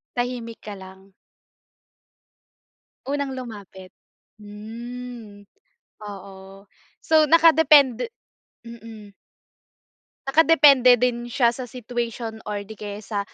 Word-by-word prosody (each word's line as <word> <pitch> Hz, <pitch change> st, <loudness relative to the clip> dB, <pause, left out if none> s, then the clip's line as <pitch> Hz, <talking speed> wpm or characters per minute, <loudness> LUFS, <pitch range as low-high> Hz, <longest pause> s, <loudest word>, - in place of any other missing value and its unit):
Tahimik 245 Hz, -2 st, -4 dB
ka 210 Hz, -1 st, -9 dB
lang. 190 Hz, 0 st, -14 dB, 2.0 s
Unang 280 Hz, -1 st, -2 dB
lumapit, 205 Hz, -7 st, -10 dB, 0.5 s
hmm, 225 Hz, +1 st, -10 dB, 0.7 s
oo, 195 Hz, -1 st, -11 dB, 0.4 s
so 315 Hz, -1 st, +4 dB
nakadepende, 320 Hz, -, +4 dB, 0.5 s
mhm. 225 Hz, -3 st, -12 dB, 1.1 s
Nakadepende, 275 Hz, -4 st, +5 dB
din 240 Hz, -1 st, 0 dB
siya 240 Hz, 0 st, +2 dB
sa 250 Hz, +2 st, -6 dB
situation 235 Hz, -2 st, -5 dB
or 205 Hz, -1 st, -4 dB
di 210 Hz, +2 st, -11 dB
kaya 205 Hz, 0 st, -7 dB
sa 205 Hz, -1 st, -4 dB
235 Hz, 85 wpm, -23 LUFS, 205-255 Hz, 2.0 s, Nakadepende